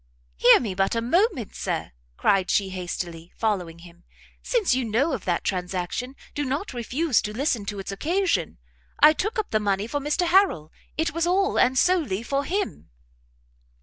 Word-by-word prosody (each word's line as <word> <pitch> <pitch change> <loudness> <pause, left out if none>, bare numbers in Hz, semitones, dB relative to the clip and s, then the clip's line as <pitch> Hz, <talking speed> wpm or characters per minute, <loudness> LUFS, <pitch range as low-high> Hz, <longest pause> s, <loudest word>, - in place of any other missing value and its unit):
"Hear - - +7
me 215 -6 -3
but 195 +4 0
a - - +1
moment, 280 - +1
Sir!" - - -3 0.3
cried 195 -2 +2
she 195 -2 +2
hastily, 175 -2 -6
following 185 -7 -1
him; 170 0 -16 0.4
"since 455 - +1
you 260 0 +1
know 245 +8 +1
of 230 - -4
that 175 -2 0
transaction, 185 +7 -3 0.2
do 290 - -2
not 280 +6 -3
refuse 255 +4 0
to 210 - -4
listen 255 -7 0
to 205 0 -4
its 195 0 -5
occasion; 305 - 0 0.4
I 310 - +8
took 425 +9 -2
up 435 - -2
the 215 - +2
money 200 -1 0
for 290 +6 -2
Mr 295 +5 0
Harrel; 345 - +3 0.3
it 320 -1 0
was 335 +1 0
all, 385 +2 +2
and 255 +1 +3
solely 290 - +2
for 275 +3 -1
him." 395 +4 -3
240 Hz, 175 wpm, -25 LUFS, -, 0.4 s, I